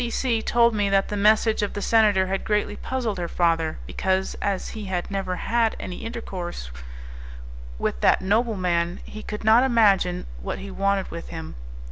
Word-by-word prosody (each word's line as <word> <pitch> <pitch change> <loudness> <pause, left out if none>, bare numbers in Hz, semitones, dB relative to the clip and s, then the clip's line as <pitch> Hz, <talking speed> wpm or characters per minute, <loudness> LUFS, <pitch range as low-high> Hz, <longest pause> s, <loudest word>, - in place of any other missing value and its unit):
C 235 - -1
C 235 -2 0
told 235 0 +3
me 205 -2 +1
that 195 0 +2
the 210 - -2
message 215 +2 +3
of 205 - -2
the - - -4
senator 210 -4 +4
had 190 +1 -2
greatly 210 -1 0
puzzled 235 -7 -3
her 175 - -2
father, 165 -2 +1
because, 190 - -1
as 200 -2 -1
he 215 -2 -7
had 185 0 -3
never 190 -2 -2
had 230 +3 +1
any 180 - -6
intercourse 185 - -6 1.1
with - - -2
that - - +4
nobleman, 190 -5 0
he 215 - -9
could 210 0 -6
not 220 +2 +6
imagine 200 -8 +3 0.2
what - - -4
he 195 0 -8
wanted 195 0 0
with 170 - -7
him. 80 0 -7
200 Hz, 175 wpm, -24 LUFS, 180-220 Hz, 1.1 s, not